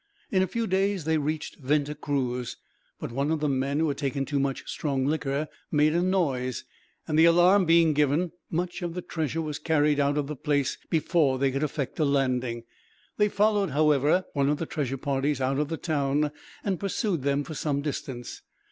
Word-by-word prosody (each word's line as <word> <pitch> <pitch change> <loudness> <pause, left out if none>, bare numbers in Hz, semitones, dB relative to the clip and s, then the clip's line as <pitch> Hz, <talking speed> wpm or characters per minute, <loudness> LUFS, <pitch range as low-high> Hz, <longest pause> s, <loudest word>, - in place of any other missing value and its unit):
In 185 - +3
a 190 - +2
few 230 +5 -2
days 195 -3 0
they 160 0 +2
reached 155 +2 -3
Venta 145 +1 0
Cruz, 130 -5 -2 0.4
but - - -5
one 140 +4 -1
of 160 -1 +1
the 150 - 0
men, 135 +1 0
who 160 +1 +2
had 140 - -3
taken 140 -1 -1
too 145 +1 -1
much 135 -1 -2
strong 135 -3 -1
liquor, 145 0 -1 0.2
made 150 0 +3
a 170 - +2
noise; 140 - 0 0.4
and 155 0 +1
the 165 - +8
alarm 175 +3 +5
being 165 -1 +5
given, 150 +4 +1 0.2
much 175 +3 -2
of 175 -1 -4
the 180 - -4
treasure 160 0 -2
was 150 -2 -4
carried 150 -2 +2
out 145 +1 +2
of 145 - 0
the 150 +2 -5
place, 145 -1 0
before 155 -4 +2
they 135 0 +1
could 135 +1 -2
effect 150 -2 -3
a 155 - +3
landing. 130 -4 0 0.5
They 210 0 +3
followed, 205 -1 +2
however, 150 +4 +3
one 140 -1 +2
of 150 - +1
the 165 - -3
treasure 135 -4 -3
parties 140 +1 -1
out 135 +1 0
of 150 - 0
the 165 +1 -3
town, 150 -2 0 0.3
and 190 -4 -1
pursued 195 - -1
them 140 +1 +1
for 160 - -7
some 145 -1 -1
distance. 130 -4 -5
150 Hz, 200 wpm, -27 LUFS, 140-165 Hz, 0.5 s, the